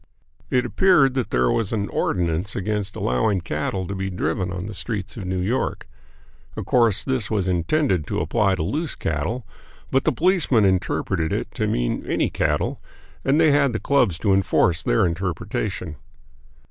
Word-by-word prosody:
It 125 Hz, -1 st, +2 dB
appeared 135 Hz, -2 st, +4 dB
that 130 Hz, -3 st, -1 dB
there 60 Hz, 0 st, +2 dB
was 110 Hz, -4 st, 0 dB
an 105 Hz, -3 st, -1 dB
ordinance 85 Hz, +4 st, -1 dB
against 105 Hz, 0 st, -2 dB
allowing 95 Hz, -, +1 dB
cattle 85 Hz, +3 st, -2 dB
to 100 Hz, -, -5 dB
be 95 Hz, 0 st, -3 dB
driven 90 Hz, 0 st, -2 dB
on 90 Hz, 0 st, -4 dB
the 105 Hz, -, -6 dB
streets 100 Hz, -1 st, -4 dB
of 105 Hz, -6 st, -6 dB
New 95 Hz, 0 st, -2 dB
York. 105 Hz, +8 st, -1 dB, 0.7 s
Of -, -, -5 dB
course, 115 Hz, -5 st, +3 dB
this 130 Hz, -6 st, -1 dB
was 100 Hz, -4 st, 0 dB
intended 90 Hz, -, +1 dB
to -, -, -1 dB
apply 100 Hz, -3 st, +1 dB
to 85 Hz, -, -2 dB
loose 150 Hz, -, -2 dB
cattle, 80 Hz, +11 st, -2 dB, 0.5 s
but 135 Hz, -, +2 dB
the 160 Hz, -, +4 dB
policemen 155 Hz, -, +2 dB
interpreted 90 Hz, -3 st, 0 dB
it -, -, -2 dB
to -, -, -1 dB
mean -, -, -1 dB
any -, -, 0 dB
cattle, -, -, -1 dB, 0.4 s
and 140 Hz, +3 st, +3 dB
they 160 Hz, -2 st, +5 dB
had 140 Hz, -3 st, +3 dB
the 110 Hz, -, -1 dB
clubs 140 Hz, -, +2 dB
to 100 Hz, -3 st, +3 dB
enforce 95 Hz, -3 st, +2 dB
their -, -, +2 dB
interpretation. 90 Hz, -1 st, -3 dB
100 Hz, 170 wpm, -23 LUFS, 90-125 Hz, 0.7 s, they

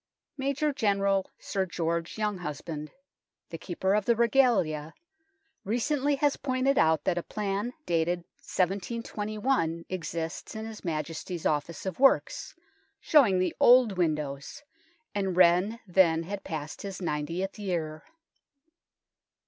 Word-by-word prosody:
Major 280 Hz, +2 st, 0 dB
General 200 Hz, -6 st, +1 dB
Sir 190 Hz, -1 st, -2 dB
George 170 Hz, -1 st, -2 dB
Younghusband, 170 Hz, -7 st, -4 dB, 0.6 s
the 165 Hz, -, -6 dB
Keeper 190 Hz, +2 st, -1 dB
of 210 Hz, -1 st, +1 dB
the 235 Hz, -, +3 dB
Regalia, 225 Hz, -, +2 dB, 0.7 s
recently 280 Hz, +6 st, +1 dB
has 285 Hz, 0 st, +1 dB
pointed 260 Hz, 0 st, +1 dB
out 160 Hz, -2 st, +3 dB
that 175 Hz, -2 st, +1 dB
a -, -, -3 dB
plan 205 Hz, +5 st, -3 dB
dated 170 Hz, +1 st, +1 dB, 0.2 s
1721 205 Hz, -1 st, -1 dB
exists 165 Hz, +1 st, -4 dB
in 220 Hz, 0 st, -5 dB
his 225 Hz, -1 st, -9 dB
Majesty's 165 Hz, +1 st, -4 dB
Office 155 Hz, +4 st, -1 dB
of 190 Hz, +1 st, -4 dB
Works, 275 Hz, 0 st, +3 dB, 0.4 s
showing 255 Hz, -, +5 dB
the 185 Hz, 0 st, 0 dB
old 245 Hz, -4 st, +6 dB
windows, 150 Hz, -, -2 dB, 0.5 s
and 195 Hz, -3 st, -1 dB
Wren 185 Hz, +5 st, +4 dB
then 170 Hz, -3 st, +3 dB
had 200 Hz, +3 st, -6 dB
passed 155 Hz, -2 st, -5 dB
his 195 Hz, -2 st, -6 dB
ninetieth 175 Hz, +4 st, -3 dB
year. 165 Hz, -6 st, -3 dB
190 Hz, 115 wpm, -28 LUFS, 165-220 Hz, 0.7 s, old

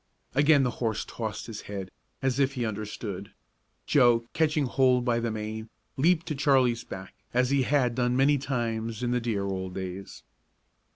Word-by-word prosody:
Again 145 Hz, +1 st, +5 dB
the 125 Hz, -, +1 dB
horse 110 Hz, -3 st, 0 dB
tossed 110 Hz, -3 st, -5 dB
his 110 Hz, -2 st, -7 dB
head, 95 Hz, -3 st, -5 dB, 0.3 s
as 135 Hz, 0 st, +1 dB
if 135 Hz, 0 st, +2 dB
he 125 Hz, -3 st, -2 dB
understood. 105 Hz, -2 st, -5 dB, 0.5 s
Joe, 120 Hz, -4 st, +4 dB
catching 155 Hz, -2 st, +2 dB
hold 125 Hz, -1 st, +3 dB
by 120 Hz, -2 st, +2 dB
the 115 Hz, 0 st, -1 dB
mane, 110 Hz, 0 st, -5 dB, 0.3 s
leaped 165 Hz, +4 st, +3 dB
to -, -, 0 dB
Charlie's 130 Hz, -5 st, +3 dB
back, 95 Hz, -3 st, -8 dB, 0.2 s
as 125 Hz, +1 st, +3 dB
he 140 Hz, -1 st, +3 dB
had 130 Hz, -2 st, +2 dB
done 125 Hz, 0 st, +1 dB
many 140 Hz, +2 st, +4 dB
times 115 Hz, -4 st, -2 dB
in 120 Hz, -, 0 dB
the 125 Hz, 0 st, +1 dB
dear 110 Hz, -4 st, -1 dB
old 95 Hz, -1 st, -4 dB
days. 95 Hz, 0 st, -6 dB
120 Hz, 170 wpm, -28 LUFS, 110-135 Hz, 0.5 s, Again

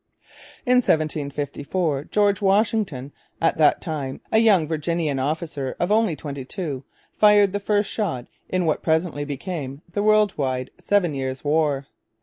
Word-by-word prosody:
In 250 Hz, 0 st, +4 dB
1754 150 Hz, -, -1 dB
George 205 Hz, 0 st, +2 dB
Washington, 195 Hz, -, +1 dB, 0.3 s
at 165 Hz, 0 st, +1 dB
that 150 Hz, -, +4 dB
time 145 Hz, -5 st, -4 dB
a 220 Hz, -, +5 dB
young 200 Hz, -8 st, +4 dB
Virginian 155 Hz, -2 st, -1 dB
officer 145 Hz, -1 st, -3 dB
of 175 Hz, +3 st, 0 dB
only 215 Hz, -6 st, +3 dB
twenty 140 Hz, -3 st, -6 dB
two, 140 Hz, -2 st, -5 dB, 0.4 s
fired 205 Hz, -2 st, +6 dB
the 205 Hz, -, 0 dB
first 205 Hz, 0 st, +1 dB
shot 165 Hz, -, -2 dB, 0.2 s
in 185 Hz, -1 st, 0 dB
what 155 Hz, -, 0 dB
presently 160 Hz, -2 st, 0 dB
became 145 Hz, -1 st, -5 dB
the 205 Hz, -, 0 dB
world 215 Hz, -1 st, +3 dB
wide 130 Hz, -2 st, -2 dB
Seven 195 Hz, -6 st, +1 dB
Years' 130 Hz, -1 st, -4 dB
War. 145 Hz, -2 st, +1 dB
160 Hz, 140 wpm, -23 LUFS, 140-200 Hz, 0.4 s, fired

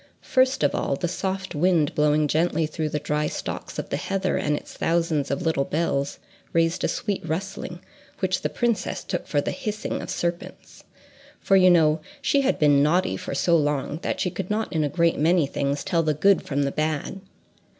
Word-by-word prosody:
First 260 Hz, -7 st, +2 dB
of 145 Hz, -, +3 dB
all, 140 Hz, -, 0 dB
the 175 Hz, -, -2 dB
soft 190 Hz, +2 st, -3 dB
wind 160 Hz, -1 st, +2 dB
blowing 150 Hz, 0 st, +2 dB
gently 160 Hz, +2 st, +1 dB
through 155 Hz, 0 st, -3 dB
the 150 Hz, -, -2 dB
dry 150 Hz, +1 st, -1 dB
stalks -, -, -5 dB
of -, -, -4 dB
the -, -, -1 dB
heather 195 Hz, -1 st, -1 dB
and 150 Hz, 0 st, 0 dB
its -, -, -10 dB
thousands 165 Hz, -4 st, 0 dB
of 140 Hz, +4 st, -2 dB
little 160 Hz, -4 st, +1 dB
bells 140 Hz, -2 st, -1 dB, 0.4 s
raised 165 Hz, 0 st, +1 dB
a -, -, +3 dB
sweet 205 Hz, -3 st, -2 dB
rustling, 175 Hz, +1 st, -4 dB, 0.4 s
which 185 Hz, -1 st, 0 dB
the -, -, -1 dB
princess 235 Hz, -6 st, -1 dB
took -, -, -4 dB
for 145 Hz, -, +1 dB
the -, -, -2 dB
hissing 215 Hz, 0 st, -4 dB
of -, -, -7 dB
serpents, 170 Hz, 0 st, -5 dB, 0.5 s
for 195 Hz, -, +2 dB
you 185 Hz, -1 st, +7 dB
know 160 Hz, -3 st, +4 dB, 0.2 s
she 280 Hz, -, +2 dB
had 275 Hz, -, +1 dB
been 145 Hz, -2 st, +4 dB
naughty 155 Hz, -, +2 dB
for 95 Hz, -, -5 dB
so 170 Hz, +5 st, +3 dB
long 150 Hz, -1 st, 0 dB
that -, -, -2 dB
she 180 Hz, -, 0 dB
could 190 Hz, 0 st, -5 dB
not 215 Hz, 0 st, -1 dB
in 160 Hz, -2 st, +1 dB
a 145 Hz, -, 0 dB
great 170 Hz, +2 st, +1 dB
many 165 Hz, +1 st, +3 dB
things 140 Hz, +1 st, -2 dB
tell 170 Hz, -3 st, +1 dB
the 155 Hz, -2 st, 0 dB
good 195 Hz, +5 st, +4 dB
from 140 Hz, 0 st, 0 dB
the 140 Hz, -, 0 dB
bad. 155 Hz, +5 st, -2 dB
165 Hz, 200 wpm, -24 LUFS, 150-185 Hz, 0.5 s, you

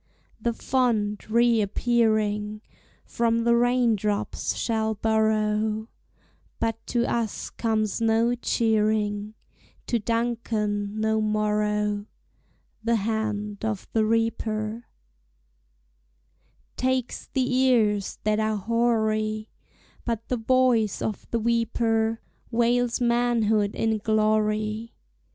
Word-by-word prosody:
The 235 Hz, +1 st, 0 dB
font, 220 Hz, -5 st, 0 dB
reappearing, 215 Hz, -2 st, +1 dB, 0.4 s
From 230 Hz, 0 st, 0 dB
the 235 Hz, 0 st, +4 dB
rain 245 Hz, -1 st, +3 dB
drops 205 Hz, 0 st, -2 dB
shall 220 Hz, -1 st, -1 dB
borrow, 220 Hz, 0 st, +1 dB, 0.7 s
But 225 Hz, 0 st, -2 dB
to 240 Hz, -1 st, +1 dB
us 230 Hz, -4 st, -2 dB
comes 220 Hz, -1 st, -1 dB
no 225 Hz, +1 st, +3 dB
cheering, 215 Hz, -3 st, 0 dB, 0.5 s
To 235 Hz, -, 0 dB
Duncan 220 Hz, -2 st, -1 dB
no 220 Hz, 0 st, +1 dB
morrow: 210 Hz, -1 st, 0 dB, 0.8 s
The 230 Hz, +1 st, +2 dB
hand 210 Hz, -1 st, -2 dB
of 220 Hz, -3 st, -3 dB
the 220 Hz, -, +3 dB
reaper 225 Hz, 0 st, -1 dB, 1.9 s
Takes 255 Hz, -1 st, -1 dB
the 255 Hz, -1 st, -1 dB
ears 230 Hz, -6 st, +2 dB
that 215 Hz, 0 st, +1 dB
are 215 Hz, 0 st, 0 dB
hoary; 215 Hz, -1 st, 0 dB, 0.5 s
But 230 Hz, -1 st, -3 dB
the 250 Hz, -, 0 dB
voice 235 Hz, -3 st, +2 dB
of 215 Hz, -, -4 dB
the 235 Hz, -, 0 dB
weeper 225 Hz, -1 st, 0 dB, 0.3 s
Wails 240 Hz, 0 st, +1 dB
manhood 235 Hz, -4 st, +2 dB
in 220 Hz, -1 st, 0 dB
glory. 215 Hz, +1 st, 0 dB
220 Hz, 95 wpm, -25 LUFS, 215-235 Hz, 1.9 s, the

